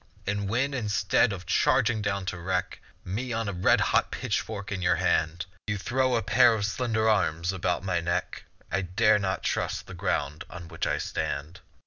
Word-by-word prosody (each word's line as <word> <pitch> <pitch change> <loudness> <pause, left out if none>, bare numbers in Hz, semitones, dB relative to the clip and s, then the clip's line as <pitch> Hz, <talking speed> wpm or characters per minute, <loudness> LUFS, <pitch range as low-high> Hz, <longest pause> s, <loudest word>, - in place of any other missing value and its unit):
And 100 0 -1
when, 135 +6 0
instead 110 -1 +2
of 90 -3 -6
charging 115 +4 +2
down 100 -2 -1
to 90 -1 -4
wreck 90 +1 -2 0.3
Me 115 +8 -3
on 115 -1 -1
a 100 - -2
red 90 +1 +3
hot - - +2
pitchfork 100 -2 -3
in 95 -2 -3
your 90 0 +3
hand, 80 0 0 0.2
You 105 0 -1
throw 130 +5 +1
a 115 - 0
pair 120 +2 +5
of 100 -2 -1
slender 110 0 0
arms 85 -4 +1
about 90 -1 -1
my 90 -3 0
neck, 85 +1 -2 0.3
I 95 - +1
dare 100 +4 +3
not 95 -1 -2
trust - - -1
the - - -10
ground 75 +2 -2
on 85 -1 -9
which 80 -2 -3
I - - +1
stand. 75 +6 -3
100 Hz, 185 wpm, -27 LUFS, 90-110 Hz, 0.3 s, pair